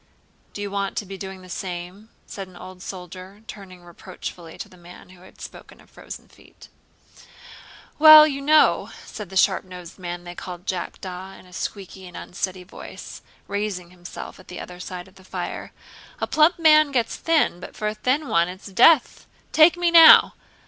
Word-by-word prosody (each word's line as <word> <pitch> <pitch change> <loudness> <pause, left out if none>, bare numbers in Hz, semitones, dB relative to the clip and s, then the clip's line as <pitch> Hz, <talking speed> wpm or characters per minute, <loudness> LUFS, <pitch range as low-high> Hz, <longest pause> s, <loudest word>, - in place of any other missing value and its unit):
"Do 205 - -6
you 200 - -5
want 200 -1 -3
to 210 - -2
be 195 +1 -8
doing 190 -1 -9
the - - -13
same?" 180 +3 -7 0.2
said 195 -2 -8
an 185 - -18
old 185 +1 -12
soldier, 185 +2 -10
turning 185 -5 -12
reproachfully 170 -1 -10
to - - -7
the - - -19
man 175 0 -15
who 185 -1 -17
had 185 - -18
spoken - - -12
of - - -22
frozen - - -11
feet. - - -19 1.3
"Well, 310 0 +10
you 280 -2 -3
know," 305 +2 +3 0.2
said 210 -4 -9
the 190 - -5
sharp 190 0 +3
nosed 180 -1 -12
man 175 -1 -6
they 175 0 -9
called 180 0 -9
Jackdaw 185 0 -6
in - - -16
a 180 - -18
squeaky 190 0 -7
and 175 - -11
unsteady 185 0 -5
voice, 180 - -11 0.3
raising 200 -4 -4
himself 180 +1 -10
at 185 - -17
the 180 - -9
other 180 0 -10
side 180 0 -8
of 190 +1 -21
the 190 - -17
fire, - - -6 0.5
"a - - -1
plump 315 +3 +3
man 310 -3 +5
gets 240 -4 -1
thin, 320 - +1
but - - -11
for 215 - -3
a 210 - -1
thin 265 +7 -1
one 170 -7 +2
it's 185 +2 -11
death. 255 +8 +4 0.2
Take 320 +3 +5
me, 350 -1 +1
now! 330 -1 +8
190 Hz, 185 wpm, -23 LUFS, 180-220 Hz, 1.3 s, Well